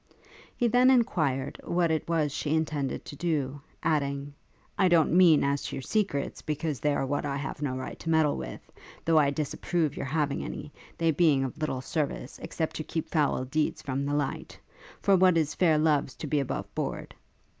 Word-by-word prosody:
He 240 - +2
then 245 +3 +5
enquired 155 - +1
what 170 -1 +1
it 160 +1 -1
was 155 -3 +1
she 150 +2 -1
intended 150 -4 -2
to - - -8
do; 145 -4 -2 0.2
adding, 140 -2 0 0.5
'I 190 - +5
don't 170 -3 +4
mean 175 -4 +6
as 140 0 +1
to - - -4
your 135 - -5
secrets, 195 -9 -1
because 150 -1 -3
they 145 -1 +1
are - - 0
what 145 +2 -1
I 140 -1 -2
have 140 +1 -5
no 135 -3 -1
right 130 - -6
to 165 - -5
meddle 160 -2 +3
with; - - -6 0.4
though 160 -1 +5
I 145 -2 +4
disapprove 155 +2 -1
your - - -4
having 145 0 0
any, 150 - -7 0.2
they 165 -1 +2
being 150 -4 +3
of 135 +4 -5
little 145 -4 -2
service, 145 -2 -3
except 160 -2 -3
to 155 - -3
keep 160 0 -4
foul 145 -5 +1
deeds 150 +4 -1
from 135 0 -2
the 145 +1 -1
light; 145 -2 -3 0.5
for 200 - +5
what 185 -2 +5
is 155 -2 +1
fair 165 -4 +3
loves 150 -3 +2
to - - -6
be 150 0 +1
above 135 - -4
board. - - -4
150 Hz, 195 wpm, -28 LUFS, 140-165 Hz, 0.5 s, mean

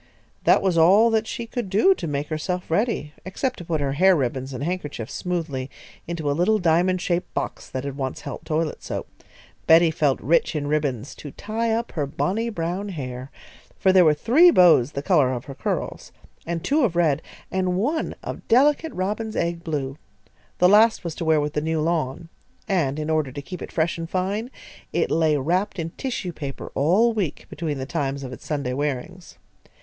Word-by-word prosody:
That - - +5
was 180 -4 +2
all 200 +8 +6
that 220 0 +1
she 235 - -4
could 230 -3 -4
do 215 - +5
to 260 - -6
make 145 0 -3
herself 170 +3 -3
ready, 205 -5 0
except 255 +8 -3
to 175 - -8
put 160 -3 -1
her 140 -1 0
hair 185 +6 +5
ribbons 130 -2 -2
and 130 +1 -5
handkerchiefs 150 -9 -4
smoothly 160 -7 -3 0.4
into 165 -3 -4
a - - +2
little 180 +8 +2
diamond 180 0 +2
shaped 175 0 -1
box - - -4
that 130 0 -4
had 140 -1 -4
once 135 -2 -4
held - - -7
toilet 155 -1 -2
soap. - - -5 0.6
Betty 165 0 +6
felt 150 -5 +1
rich 165 +2 +2
in 145 -1 -1
ribbons 145 -4 -1
"to 145 - -9
tie 225 +8 -2
up 230 +1 -1
her 150 -4 -2
bonnie 215 +11 -1
brown 185 +1 -3
hair," 130 -6 -6 0.5
for 190 -1 +3
there 185 -1 +7
were 155 -2 +5
three 295 - +6
bows 165 - +5
the 140 - -4
colour 150 -8 +3
of 125 -2 -4
her 140 - -7
curls, - - -4 0.4
and 170 -1 -3
two 300 +3 +2
of 195 -8 +1
red, 160 -4 +2 0.3
and 185 -1 0
one 295 - -1
of - - -7
delicate 295 +6 +3
robin's 210 +4 -3
egg 170 0 -1
blue. 145 -4 -3 0.6
The 180 - +5
last 215 +4 +5
was 170 -2 -4
to 165 - -5
wear 160 -1 +4
with 150 0 -2
the 150 - 0
new 160 +1 -1
lawn, 160 -1 -1 0.4
and, 155 -8 +1
in 155 +1 -2
order 155 -4 0
to 145 - -7
keep 180 +5 -8
it - - -7
fresh 165 +1 0
and 165 0 -5
fine, 195 +6 -2 0.4
it - - 0
lay 160 -2 +3
wrapped 180 +9 0
in 165 -1 -3
tissue 220 -9 -4
paper 140 -3 -7
all 195 - +3
week, 195 -9 -3
between 150 -2 -3
the 130 - -4
times 140 -2 -2
of 130 -1 -6
its - - -11
Sunday 140 -5 -2
wearings. 150 +6 -4
165 Hz, 195 wpm, -23 LUFS, 145-190 Hz, 0.6 s, there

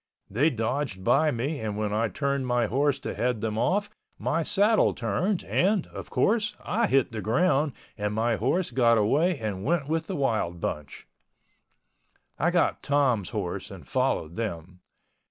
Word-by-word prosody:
They 135 +10 +3
dodged 115 -4 -2
by 155 +10 +4
me 140 +4 -2
and 105 -2 -3
when 105 -1 -1
I 115 +2 +1
turned 140 +1 -2
my 120 -1 +2
horse 140 +4 +1
to - - -4
head 125 -1 -1
them 110 0 -2
off 205 - +1 0.3
my 165 - 0
saddle 205 +6 +3
turned 165 - -1
and, 195 0 +1
of - - -9
course, 215 -1 +1
I 230 +1 +1
hit 135 -5 +2
the 110 -1 -4
ground 145 - +2 0.3
and 105 0 -1
my 115 +1 +1
horse 165 - 0
got 115 -3 +4
away 150 - +2
and 105 -5 -4
went 155 0 0
with 160 +1 -1
the - - -3
wild 110 - -1
bunch. 75 -3 -5 1.3
I 170 - +3
got 175 -1 +1
Tom's 135 -9 +1
horse 100 -6 -4
and - - -11
followed 80 +2 -1
them. 90 -5 -5
130 Hz, 165 wpm, -27 LUFS, 110-160 Hz, 1.3 s, by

